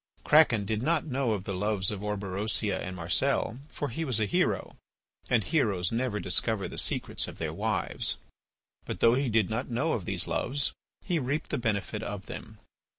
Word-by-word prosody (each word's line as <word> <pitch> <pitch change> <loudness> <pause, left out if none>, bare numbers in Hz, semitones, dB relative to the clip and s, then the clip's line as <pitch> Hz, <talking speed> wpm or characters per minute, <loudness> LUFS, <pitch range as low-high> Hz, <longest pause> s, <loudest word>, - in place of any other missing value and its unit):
Kraken 125 -9 +5
did 110 +1 -1
not 160 +4 +1
know 130 -5 0
of 100 -3 -3
the 100 - -4
loves 100 0 +2
of 100 -2 -5
Orberosia 105 0 -1
and 90 0 -5
Marcel, 110 +7 +1
for 145 - -4
he 145 +8 -3
was 130 -8 +1
a 110 - +2
hero, 100 - 0 0.5
and 120 -4 +3
heroes 100 - +1
never 115 -2 0
discover 100 +2 +2
the - - -3
secrets - - +1
of - - -9
their - - -3
wives. - - -1 0.7
But - - -4
though 115 - +6
he 135 +1 +1
did 110 -2 +2
not 125 +5 -2
know 135 +7 0
of 100 - -2
these - - -1
loves, 140 +2 0 0.3
he 175 -4 +1
reaped 145 +3 -2
the - - 0
benefit 105 -2 -1
of 100 -2 -5
them. - - -8
110 Hz, 185 wpm, -29 LUFS, 100-130 Hz, 0.7 s, though